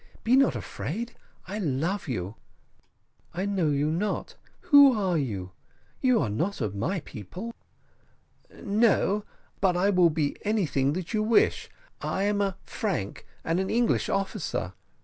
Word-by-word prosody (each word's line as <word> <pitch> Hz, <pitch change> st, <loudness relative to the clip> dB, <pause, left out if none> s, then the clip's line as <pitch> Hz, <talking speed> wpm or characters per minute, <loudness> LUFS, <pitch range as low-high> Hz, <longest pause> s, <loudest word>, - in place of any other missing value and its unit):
Be 240 Hz, +3 st, +4 dB
not 270 Hz, 0 st, +4 dB
afraid 230 Hz, +10 st, -5 dB, 0.3 s
I 205 Hz, +3 st, -4 dB
love 170 Hz, +4 st, -1 dB
you." 100 Hz, -6 st, -3 dB, 1.0 s
"I 185 Hz, +3 st, -1 dB
know 195 Hz, -5 st, +1 dB
you 145 Hz, +1 st, +1 dB
not; 195 Hz, +6 st, -2 dB, 0.3 s
who 285 Hz, -7 st, +7 dB
are 185 Hz, -3 st, +1 dB
you? 100 Hz, -, -2 dB, 0.5 s
you 255 Hz, -3 st, +3 dB
are 120 Hz, -, 0 dB
not 170 Hz, -, -1 dB
of 100 Hz, -, -2 dB
my 165 Hz, -, -1 dB
people." 180 Hz, -, -8 dB, 1.0 s
"No, 210 Hz, -1 st, +1 dB, 0.3 s
but 185 Hz, -2 st, +2 dB
I 195 Hz, +3 st, +3 dB
will 180 Hz, -3 st, +5 dB
be 150 Hz, -2 st, -1 dB
anything 165 Hz, -10 st, +1 dB
that 180 Hz, +5 st, -4 dB
you 215 Hz, -, +2 dB
wish. 220 Hz, +1 st, +2 dB, 0.3 s
I 195 Hz, -, -1 dB
am 205 Hz, 0 st, +1 dB
a 195 Hz, -2 st, -1 dB
Frank, 180 Hz, -, -3 dB, 0.2 s
and 165 Hz, +2 st, 0 dB
an 190 Hz, -, -1 dB
English 235 Hz, 0 st, +1 dB
officer." 195 Hz, -, -2 dB
190 Hz, 145 wpm, -27 LUFS, 150-210 Hz, 1.0 s, who